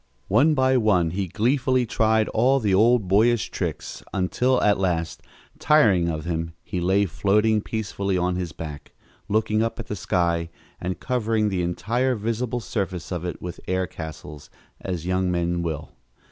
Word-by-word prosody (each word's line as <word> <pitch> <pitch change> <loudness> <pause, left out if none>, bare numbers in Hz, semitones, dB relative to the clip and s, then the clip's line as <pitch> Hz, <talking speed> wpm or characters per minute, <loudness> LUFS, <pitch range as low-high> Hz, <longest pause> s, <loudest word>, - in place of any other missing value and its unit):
One 145 +10 +4
by 130 -1 +3
one 95 -8 +2
he 95 +1 -2
gleefully 130 - +1
tried 110 -1 +2
all 130 +5 +3
the 105 -5 +1
old 110 +1 +4
boyish 110 +4 +3
tricks - - -4
until 125 +7 +1
at 105 -2 +3
last, 85 -3 -1 0.4
tiring 105 - +4
of 80 -2 -3
them, 80 0 -3
he 90 - -4
lay 95 +3 +3
floating 105 +4 +2
peacefully 100 -3 -2
on 90 0 0
his 90 -2 -3
back, 75 -3 -8 0.4
looking 110 0 +1
up 115 0 -2
at - - -5
the 105 - -4
sky 85 -3 0 0.3
and 90 +1 -4
covering 110 -4 0
the 95 -3 -1
entire 120 +9 0
visible 115 +2 -2
surface 95 -6 -4
of 90 -1 -3
it 90 - -5
with 90 0 -6
air 95 0 0
castles, 75 -3 -9 0.3
as 90 -3 -4
young 90 0 0
men 85 0 0
will. 80 -3 -4
100 Hz, 160 wpm, -24 LUFS, 90-115 Hz, 0.4 s, One